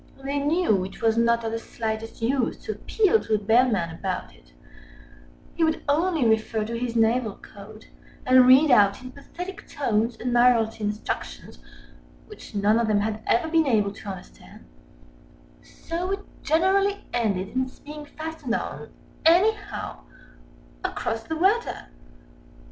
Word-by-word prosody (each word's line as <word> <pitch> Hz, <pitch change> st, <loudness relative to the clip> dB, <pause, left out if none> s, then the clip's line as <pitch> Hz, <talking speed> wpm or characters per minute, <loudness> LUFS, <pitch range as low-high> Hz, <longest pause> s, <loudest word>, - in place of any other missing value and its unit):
They 280 Hz, +1 st, -1 dB
knew 290 Hz, -, +1 dB
it 190 Hz, -, -9 dB
was 225 Hz, -1 st, +3 dB
not 235 Hz, 0 st, +2 dB
of 225 Hz, -, -2 dB
the 230 Hz, -, -3 dB
slightest 225 Hz, 0 st, -5 dB
use 250 Hz, 0 st, 0 dB
to 440 Hz, -, -3 dB
appeal 440 Hz, 0 st, +2 dB
to 215 Hz, -, 0 dB
the 210 Hz, -, -9 dB
Bellman 220 Hz, -6 st, +2 dB
about 185 Hz, +2 st, -4 dB
it—he -, -, -11 dB
would 320 Hz, 0 st, 0 dB
only 315 Hz, -2 st, +2 dB
refer 220 Hz, 0 st, +1 dB
to 230 Hz, +2 st, -4 dB
his 235 Hz, 0 st, -3 dB
Naval 225 Hz, -1 st, +2 dB
Code, 215 Hz, +2 st, -13 dB, 0.4 s
and 255 Hz, 0 st, +6 dB
read 270 Hz, +3 st, +7 dB
out 205 Hz, 0 st, +4 dB
in 255 Hz, -, -8 dB
pathetic 355 Hz, +7 st, -9 dB
tones 230 Hz, -4 st, -1 dB
Admiralty 240 Hz, -3 st, +2 dB
Instructions 210 Hz, +1 st, -5 dB, 0.7 s
which 425 Hz, -, -13 dB
none 205 Hz, +3 st, +3 dB
of 235 Hz, -, +1 dB
them 210 Hz, -1 st, +2 dB
had 215 Hz, +1 st, -3 dB
ever 240 Hz, -, +2 dB
been 320 Hz, -1 st, +2 dB
able 210 Hz, -5 st, +2 dB
to 205 Hz, 0 st, -9 dB
understand—so 185 Hz, -, -11 dB, 1.4 s
it 395 Hz, +1 st, -1 dB, 0.2 s
generally 390 Hz, +5 st, +1 dB
ended 200 Hz, -5 st, 0 dB
in 260 Hz, -, -1 dB
its 255 Hz, -, -14 dB
being 300 Hz, +1 st, -9 dB
fastened 310 Hz, -5 st, -5 dB
on, -, -, -5 dB, 0.3 s
anyhow, 405 Hz, +6 st, +2 dB, 0.8 s
across 300 Hz, -11 st, -2 dB
the 320 Hz, +8 st, -5 dB
rudder. 395 Hz, +8 st, 0 dB
235 Hz, 140 wpm, -25 LUFS, 215-315 Hz, 1.4 s, read